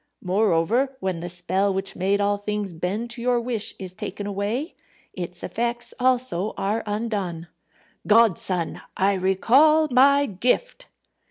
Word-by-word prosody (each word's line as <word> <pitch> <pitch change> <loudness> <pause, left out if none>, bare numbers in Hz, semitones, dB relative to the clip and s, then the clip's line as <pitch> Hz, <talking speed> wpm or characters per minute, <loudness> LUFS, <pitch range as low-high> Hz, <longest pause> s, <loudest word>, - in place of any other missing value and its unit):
Moreover, 215 +7 +1
when 190 -3 -2
the 175 +1 -5
spell 185 +3 0
which 190 0 -3
made 195 +3 +1
all 205 0 +1
things 205 -2 -3
bend 195 +8 -3
to 240 0 -6
your 245 0 +2
wish 230 -3 -1
is 185 -2 -7
taken 200 +2 -6
away, 205 - -3 0.4
its 175 -1 -6
effects 240 +1 -2
also 245 -6 +1
are 205 +3 -1
undone. 205 -6 -3 0.6
Godson! 195 -6 +2 0.2
I 195 +1 +3
recall 255 +12 +4
my 280 +3 +5
gift." 255 - -1
205 Hz, 135 wpm, -24 LUFS, 185-240 Hz, 0.6 s, my